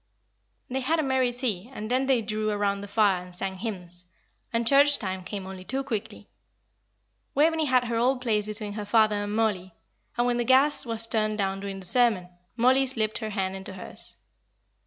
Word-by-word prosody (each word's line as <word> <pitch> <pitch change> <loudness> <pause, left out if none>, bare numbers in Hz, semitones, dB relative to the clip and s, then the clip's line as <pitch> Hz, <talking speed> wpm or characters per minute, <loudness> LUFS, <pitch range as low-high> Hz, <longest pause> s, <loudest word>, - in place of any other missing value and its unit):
They 260 +1 -3
had 310 +6 0
a - - +1
merry 260 -2 +1
tea, 240 -4 -3
and 215 -3 -6
then 260 +1 +1
they 255 -4 +2
drew 215 0 -2
round 200 -1 -1
the 205 - -7
fire 200 -3 +2
and 180 0 -11
sang 190 +1 -4
hymns; 180 -5 -3 0.5
and 230 0 0
church 285 +2 +5
time 190 -2 -4
came 195 0 -6
only 190 -1 -8
too 265 +7 -2
quickly. 225 -7 -5 1.1
Waveney 320 +2 +3
had 255 -3 +3
her 235 -1 -2
old 250 +3 +2
place 215 -4 0
between 210 -1 -5
her 210 0 -5
father 215 0 +3
and 205 +1 -3
Mollie; 195 -5 -1 0.4
and 240 - +2
when 245 -1 +1
the 240 - 0
gas 265 +2 +4
was 225 0 +2
turned 215 -1 0
down 195 -1 -1
during 195 -1 -6
the - - +4
sermon, 210 -3 +4 0.3
Mollie 260 +3 +4
slipped 220 -4 0
her 220 - -4
hand 190 -2 -2
into 195 +2 -6
hers. - - -6
220 Hz, 195 wpm, -26 LUFS, 200-250 Hz, 1.1 s, church